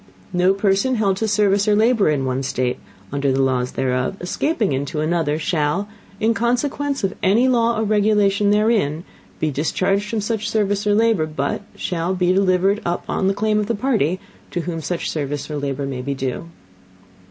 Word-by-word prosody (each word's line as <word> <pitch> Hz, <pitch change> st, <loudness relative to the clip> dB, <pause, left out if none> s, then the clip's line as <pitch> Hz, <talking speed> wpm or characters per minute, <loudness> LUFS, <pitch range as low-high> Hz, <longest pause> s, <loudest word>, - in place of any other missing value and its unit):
No 180 Hz, +2 st, +3 dB
person 200 Hz, +5 st, +1 dB
held 200 Hz, -4 st, +1 dB
to 220 Hz, -, -1 dB
Service 205 Hz, -1 st, +2 dB
or 210 Hz, -, +4 dB
Labor 220 Hz, -3 st, +3 dB
in 140 Hz, -3 st, 0 dB
one 130 Hz, +1 st, -1 dB
State, 130 Hz, -2 st, -1 dB, 0.3 s
under 140 Hz, -1 st, 0 dB
the 135 Hz, +1 st, +2 dB
Laws 125 Hz, -1 st, 0 dB
thereof, 130 Hz, +6 st, -1 dB
escaping 210 Hz, -, -1 dB
into 140 Hz, +3 st, -2 dB
another, 155 Hz, -1 st, 0 dB
shall, 160 Hz, +4 st, 0 dB, 0.3 s
in 225 Hz, +1 st, +2 dB
Consequence 275 Hz, +4 st, -1 dB
of 195 Hz, -, 0 dB
any 220 Hz, +7 st, +3 dB
Law 235 Hz, -2 st, +2 dB
or 220 Hz, -, 0 dB
Regulation 205 Hz, -1 st, +2 dB
therein, 205 Hz, -7 st, +2 dB, 0.4 s
be 155 Hz, -, 0 dB
discharged 190 Hz, +8 st, 0 dB
from 225 Hz, -, -1 dB
such 215 Hz, +1 st, -2 dB
Service 205 Hz, -1 st, 0 dB
or 205 Hz, -, +4 dB
Labor, 220 Hz, -7 st, +2 dB
But 145 Hz, +3 st, -2 dB
shall 175 Hz, +1 st, -2 dB
be 180 Hz, 0 st, +2 dB
delivered 195 Hz, +2 st, +2 dB
up 175 Hz, 0 st, -2 dB
on 190 Hz, 0 st, +1 dB
Claim 215 Hz, 0 st, +1 dB
of 210 Hz, -, -1 dB
the 230 Hz, -, 0 dB
Party 200 Hz, -, 0 dB, 0.3 s
to 175 Hz, -, -2 dB
whom 165 Hz, -1 st, -4 dB
such 175 Hz, +2 st, -3 dB
Service 145 Hz, -1 st, -3 dB
or 150 Hz, -, -2 dB
Labor 140 Hz, -1 st, -3 dB
may 135 Hz, -2 st, -4 dB
be 140 Hz, +2 st, -3 dB
due. 130 Hz, +2 st, -3 dB
190 Hz, 180 wpm, -21 LUFS, 150-215 Hz, 0.4 s, or